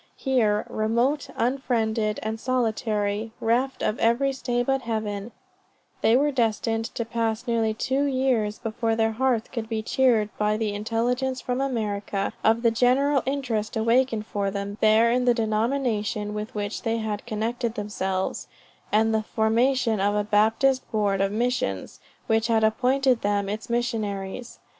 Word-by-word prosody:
Here, 225 -6 +1
"remote, 235 +7 0
unfriended" 225 -4 0
and 220 +1 -3
solitary 220 -3 -1
"reft 250 +4 0
of 215 - 0
every 255 +4 +2
stay 245 -2 -1
but 270 +1 0
Heaven" 215 -2 -3 0.7
they 225 +2 +5
were 290 +2 +2
destined 225 -2 0
to 235 - -2
pass 225 0 -2
nearly 225 -3 0
two 265 +5 0
years, 255 -6 +1
before 225 0 -1
their 225 0 +2
hearts 240 0 0
could 230 -3 -5
be 220 -1 -2
cheered 230 -4 +2
by 210 0 +2
the 215 -2 -1
intelligence 245 +5 -1
from 250 +2 -2
America, 210 -6 -2
of 225 +2 +3
the 230 - +4
general 260 +4 +3
interest 240 -7 -2
awakened 230 0 +2
for 200 -2 -2
them 200 +1 -5
there 220 +2 +5
in 250 +1 +1
the 245 -1 +4
denomination 220 -2 -1
with 210 +1 -5
which 205 0 -3
they 230 0 -1
had 215 -1 -4
connected 230 +1 -2
themselves; 190 -3 -3 0.4
and 220 +1 +3
the 220 - +2
formation 225 +1 +1
of 205 +1 +2
a 210 - +1
Baptist 225 +6 +3
Board 205 -3 +1
of 195 0 +1
Missions, 220 - -2 0.3
which 225 0 +1
had 225 -2 +2
appointed 255 +3 +2
them 200 -1 0
its 215 +4 -5
Missionaries. 225 -2 -3
225 Hz, 150 wpm, -25 LUFS, 215-250 Hz, 0.7 s, they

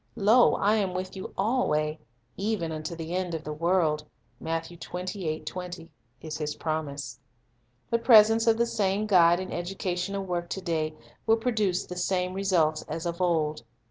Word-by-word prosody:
"Lo, 225 +5 +5
I 210 +2 +2
am 190 -3 -1
with 185 +1 -4
you 190 - -6
alway, 160 -9 +1 0.4
even 195 -5 -1
unto 155 +1 -5
the 165 +1 -5
end 180 -2 -1
of 160 - -5
the 150 - -4
world," 160 -2 +1 0.4
1 165 0 -2
is 165 - -6
His 150 -1 -2
promise. 155 -3 -4 0.7
The 230 - +3
presence 225 -1 +6
of 225 -1 +5
the 235 - +3
same 205 -2 0
Guide 175 -4 +5
in 185 0 -5
educational 185 +2 -3
work 175 -2 -3
to 190 - -4
day 160 -3 -1 0.3
will 225 0 +5
produce 215 -6 0
the 180 - -7
same 180 0 0
results 175 -5 +1
as 160 +3 -4
of 170 +1 -3
old. 155 -6 +1
180 Hz, 155 wpm, -27 LUFS, 160-195 Hz, 0.7 s, presence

